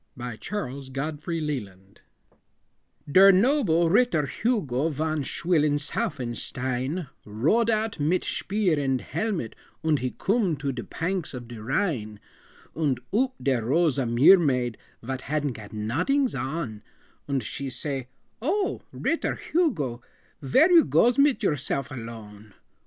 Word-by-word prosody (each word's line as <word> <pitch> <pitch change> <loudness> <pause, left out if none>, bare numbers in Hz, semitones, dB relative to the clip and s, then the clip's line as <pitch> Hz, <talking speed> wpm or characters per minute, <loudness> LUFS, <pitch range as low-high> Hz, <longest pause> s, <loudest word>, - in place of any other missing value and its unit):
_ 120 -3 -6
CHARLES 135 - -5
GODFREY 150 +5 -3
LELAND 100 -11 -6 1.0
BALLAD - - -10
Der 195 +1 +9
noble 195 - +3
Ritter 205 - +3
Hugo 160 - 0
Von 155 +1 -1
Schwillensaufenstein, 140 - -1 0.2
Rode 155 - +1
out 220 -4 0
mit 160 +5 +1
shpeer 190 -6 0
and 135 -2 0
helmet 200 - -3 0.3
Und 155 -3 +2
he 130 - -1
coom 195 -7 +1
to 140 0 -2
de 125 -2 -5
panks 165 - -3
of 120 -2 -8
de 115 -2 -9
Rhine 120 - -1 0.6
Und 145 -5 0 0.2
oop 260 +3 +1
dere 130 -4 +1
rose 150 +1 +2
a 130 - 0
meer 130 +11 +7
maid, 125 -7 0 0.2
Vot 130 +2 -4
hadn't 145 -1 -1
got 105 -2 -11
nodings 145 - 0
on, 135 -7 -4 0.5
Und 135 -3 0
she 135 +5 -4
say, 135 0 -4 0.3
"Oh, 385 - 0
Ritter 330 - -1
Hugo, 155 - -1 0.4
Vhere 265 - +4
you 335 -3 +8
goes 245 +2 +3
mit 280 -4 +3
yourself 140 -5 0
alone?" 110 -4 -9
145 Hz, 130 wpm, -26 LUFS, 125-190 Hz, 1.0 s, Der